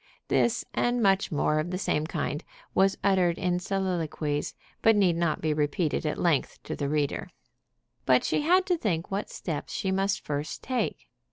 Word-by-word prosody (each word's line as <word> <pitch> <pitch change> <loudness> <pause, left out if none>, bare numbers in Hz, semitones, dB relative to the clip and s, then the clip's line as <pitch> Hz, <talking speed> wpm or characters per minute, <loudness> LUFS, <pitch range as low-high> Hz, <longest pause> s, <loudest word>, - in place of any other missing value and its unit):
This 235 +1 +2
and 245 0 +1
much 195 -2 +3
more 150 0 +1
of 155 +3 -2
the 180 - -2
same 155 -5 0
kind 155 -3 -3 0.3
was 195 0 +3
uttered 185 -4 +3
in 180 -1 0
soliloquies, 170 -6 -2 0.3
but 225 0 +5
need 190 -5 +3
not 170 -2 0
be 155 -1 +1
repeated 150 +1 0
at 150 - -1
length 165 -6 +1
to - - -4
the 140 -1 -2
reader. 145 -1 -1 0.8
But 125 -1 +5
she - - +1
had 365 +5 +4
to 360 -2 +1
think 170 - -1
what 200 +2 -2
steps 160 -5 -5
she 190 - -1
must 195 +1 0
first 145 +1 -3
take. 250 -4 -2
175 Hz, 175 wpm, -28 LUFS, 155-195 Hz, 0.8 s, but